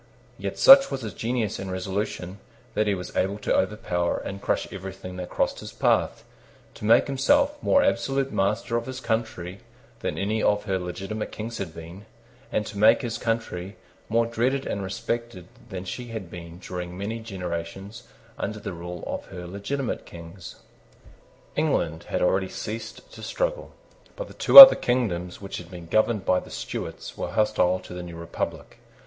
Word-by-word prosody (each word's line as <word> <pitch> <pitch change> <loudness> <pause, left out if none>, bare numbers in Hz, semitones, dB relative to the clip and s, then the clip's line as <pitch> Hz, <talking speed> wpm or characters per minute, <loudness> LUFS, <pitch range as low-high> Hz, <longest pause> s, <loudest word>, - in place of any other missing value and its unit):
Yet - - -4
such, 275 0 +9
was 135 -2 -4
his 110 -4 -5
genius 115 0 -2
and 95 -1 -5
resolution 95 0 -4 0.3
that 110 -1 +1
he 100 - +2
was 90 -1 -8
able 95 +2 0
to - - 0
overpower 90 -3 0
and 100 0 -6
crush - - -1
everything 95 -1 -8
that 90 -1 -6
crossed - - -1
his - - -8
path, - - +1 0.5
to - - -8
make 110 - +5
himself 285 - +2
more 280 - +4
absolute 135 - 0
master 105 +4 0
of 120 - -4
his 130 0 -5
country 110 -6 -3 0.4
than - - -3
any 105 +3 -1
of 105 0 +2
her 95 -3 -1
legitimate 95 +4 -5
Kings 115 +2 -6
had 85 -5 -5
been, 85 +6 -10 0.4
and 105 - 0
to 100 -1 -7
make 110 +2 +5
his 120 -2 -3
country 110 -5 -3 0.3
more 115 +1 +2
dreaded 125 +4 -1
and 100 - -3
respected 105 0 -4 0.2
than 95 0 -6
she 120 +7 -6
had 110 -7 -7
been 85 -1 -9
during 90 -1 -7
many 110 +4 -4
generations 95 +1 -6 0.3
under 105 +1 -3
the 100 - -6
rule 85 0 -7
of - - -5
her 90 -2 -9
legitimate 100 +9 -4
Kings. 85 +3 -11 1.0
England 80 +1 0
had - - -1
already 95 +1 +1
ceased 110 +1 -7
to - - -11
struggle. - - -3 0.4
But - - -6
the - - -12
two - - +3
other 270 -1 +16
kingdoms 90 -8 -1
which 100 - -6
had 90 -1 -9
been 90 -2 -9
governed 110 +3 +1
by 90 - +3
the - - -13
Stuarts - - -6
were - - -3
hostile 95 -4 +2
to - - -11
the 90 - -6
new 85 -1 -8
republic. 85 0 -5
100 Hz, 175 wpm, -25 LUFS, 90-115 Hz, 1.0 s, other